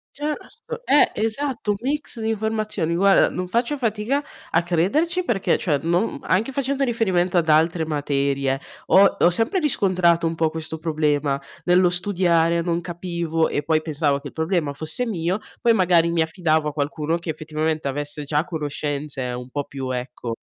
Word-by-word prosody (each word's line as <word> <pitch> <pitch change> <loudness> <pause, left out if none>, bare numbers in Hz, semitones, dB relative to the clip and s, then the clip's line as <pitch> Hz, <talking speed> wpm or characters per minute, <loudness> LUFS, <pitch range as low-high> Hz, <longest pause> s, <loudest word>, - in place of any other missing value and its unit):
Certo, 455 - -6
eh, 290 - +5
esatto, 230 -1 -1
un 200 - -1
mix 280 -2 -3
di 220 - -1
informazioni. 215 -6 -1
Guarda, 195 +3 +4
non 180 0 -3
faccio 240 +8 -1
fatica 230 +5 0 0.3
a 165 - +3
crederci 280 - +1
perché, 220 - +1
cioè, 150 -6 0
non, 175 +5 +2
mhmm, 185 - -4
anche 200 - 0
facendo 275 +1 -1
riferimento 190 -8 +1
ad 160 -2 -1
altre 160 +2 +3
materie, 140 -3 0 0.3
ho 195 +1 +7
ho 175 - +6
sempre 225 - 0
riscontrato 185 - +2
un 165 - -2
po' 160 -1 +1
questo 160 0 -5
problema 150 -3 0 0.2
nello 180 0 +4
studiare, 175 -2 +2
non 170 0 0
capivo 170 -1 -2
e 145 - -2
poi 155 0 +2
pensavo 150 -3 0
che 140 - -8
il - - -11
problema 160 -3 -1
fosse 155 - -2
mio, 180 -1 -1 0.2
poi 235 -1 +4
magari 175 -4 +3
mi 170 -1 +2
affidavo 160 -2 +1
a 150 - -8
qualcuno 150 +2 -1
che 170 -1 -4
effettivamente 155 0 -2
avesse 145 +1 -4
già 150 +2 0
conoscenze 145 -4 -3
un 125 +1 -6
po' 145 +2 -3
più, 135 -2 -6
ecco, 125 -2 -4
170 Hz, 170 wpm, -22 LUFS, 150-205 Hz, 0.3 s, ho